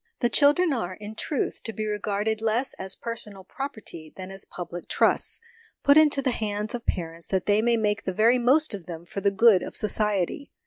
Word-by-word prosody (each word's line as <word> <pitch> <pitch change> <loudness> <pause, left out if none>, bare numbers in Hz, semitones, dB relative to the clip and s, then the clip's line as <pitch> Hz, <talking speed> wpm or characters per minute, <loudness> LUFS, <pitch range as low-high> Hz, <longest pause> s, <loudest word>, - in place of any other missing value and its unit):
The 240 - +1
children 300 +3 +5
are, 185 -7 -3
in 210 +2 -8
truth, 275 +5 -2
to 225 - -4
be 215 0 -3
regarded 210 +1 -1
less 225 +4 0
as 190 0 -4
personal 210 -4 -6
property 210 - -7
than 185 0 -8
as 195 0 -6
public 175 -1 -7
trusts, - - +2 0.4
put 280 - +6
into 300 -3 +5
the 260 - +2
hands 210 -2 -2
of 240 -1 -6
parents 165 -1 -3
that 190 -2 -1
they 205 +1 +3
may 235 0 +2
make 210 -2 0
the 190 - 0
very 230 +6 +4
most 270 +4 +3
of 195 -5 -7
them 170 -1 -7
for 200 - -6
the 200 - +3
good 200 -1 +5
of - - -7
society. 210 - 0
210 Hz, 200 wpm, -26 LUFS, 190-240 Hz, 0.4 s, put